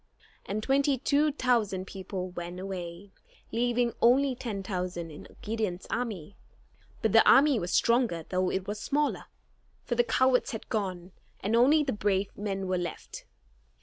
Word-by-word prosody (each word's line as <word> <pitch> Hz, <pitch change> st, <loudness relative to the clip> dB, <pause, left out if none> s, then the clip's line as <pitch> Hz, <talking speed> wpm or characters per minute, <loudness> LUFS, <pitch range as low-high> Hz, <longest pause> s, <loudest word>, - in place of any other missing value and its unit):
And 210 Hz, +2 st, -3 dB
twenty 275 Hz, +1 st, +2 dB
two 290 Hz, +4 st, +2 dB
thousand 230 Hz, -9 st, 0 dB
people 190 Hz, -1 st, -6 dB
went 175 Hz, 0 st, -6 dB
away, 185 Hz, 0 st, -6 dB, 0.4 s
leaving 240 Hz, 0 st, +1 dB
only 260 Hz, +3 st, +4 dB
ten 225 Hz, -6 st, -5 dB
thousand 180 Hz, -3 st, -4 dB
in 150 Hz, -, -11 dB, 0.2 s
Gideon's 210 Hz, -5 st, -3 dB
army. 210 Hz, -7 st, -3 dB, 0.7 s
But -, -, +2 dB
the -, -, +7 dB
army 275 Hz, -3 st, +6 dB
was 175 Hz, -1 st, -4 dB
stronger 230 Hz, -9 st, +2 dB
though 185 Hz, 0 st, 0 dB
it 190 Hz, 0 st, -3 dB
was 205 Hz, +1 st, -4 dB
smaller, 295 Hz, +6 st, -1 dB, 0.6 s
for -, -, -2 dB
the 240 Hz, 0 st, +3 dB
cowards 260 Hz, +2 st, +2 dB
had 225 Hz, -, -7 dB
gone, 185 Hz, -5 st, -3 dB, 0.3 s
and 210 Hz, +4 st, 0 dB
only 285 Hz, +6 st, +5 dB
the 270 Hz, -, -1 dB
brave 200 Hz, -2 st, -1 dB
men 195 Hz, -2 st, -3 dB
were 185 Hz, -1 st, 0 dB
left. 175 Hz, -2 st, -6 dB
210 Hz, 150 wpm, -29 LUFS, 185-245 Hz, 0.7 s, the